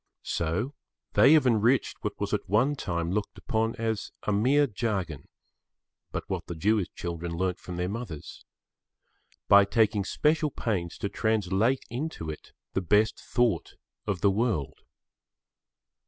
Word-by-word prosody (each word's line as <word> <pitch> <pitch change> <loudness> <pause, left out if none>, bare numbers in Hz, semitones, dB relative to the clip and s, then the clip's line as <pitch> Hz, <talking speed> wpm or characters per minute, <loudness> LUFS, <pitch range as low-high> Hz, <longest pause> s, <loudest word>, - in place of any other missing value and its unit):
So 90 - -1 0.4
they 140 - +7
have 155 -4 +5
enriched 120 +2 +3
what - - -3
was - - -2
at - - -2
one 120 +9 +3
time 85 -9 -2
looked 105 +2 -2
upon 115 0 -1
as 110 -2 -2
a - - 0
mere 135 +8 +4
jargon—but 100 - -6
what - - -4
the 85 - -5
Jewish 100 +2 +1
children 85 0 -4
learnt 95 0 -1
from 90 -1 -7
their 90 0 -1
mothers—by 100 0 -2
taking 105 0 +2
special 155 - +1
pains 95 -10 -3
to - - -2
translate 110 +4 +1
into 125 - -4
it 75 - -11 0.2
the 95 - 0
best 105 +5 +2
thought 120 -2 0 0.3
of 100 -4 -1
the 100 0 +4
world. 100 - -1
105 Hz, 135 wpm, -28 LUFS, 90-120 Hz, 0.4 s, they